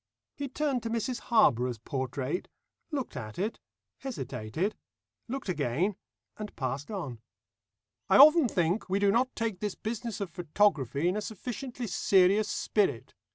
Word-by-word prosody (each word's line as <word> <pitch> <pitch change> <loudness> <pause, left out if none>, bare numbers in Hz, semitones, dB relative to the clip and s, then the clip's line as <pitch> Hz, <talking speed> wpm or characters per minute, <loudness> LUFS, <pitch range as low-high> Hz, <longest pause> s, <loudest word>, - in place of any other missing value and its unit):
He 285 - -4
turned 275 -2 0
to 230 - -4
Mrs 235 +2 -1
Harborough's 125 - +3
portrait, 130 - -3 0.4
looked 280 - -3
at 110 -5 -6
it, 210 +5 -2 0.4
hesitated, 165 - -3 0.5
looked 265 0 -4
again, 170 - 0 0.4
and 210 -1 -7
passed 135 +1 -3
on. 150 - -5 0.9
"I - - +6
often 305 +1 +8
think 180 0 0
we 190 - +2
do 200 0 +4
not 250 +4 +1
take 225 -5 -2
this 210 -2 -2
business 225 0 -4
of 195 -4 -4
photography 165 - +1
in 180 - +1
a 210 - -1
sufficiently 245 +4 -5
serious 195 +1 +3
spirit. 195 - 0
200 Hz, 140 wpm, -30 LUFS, 145-230 Hz, 0.9 s, often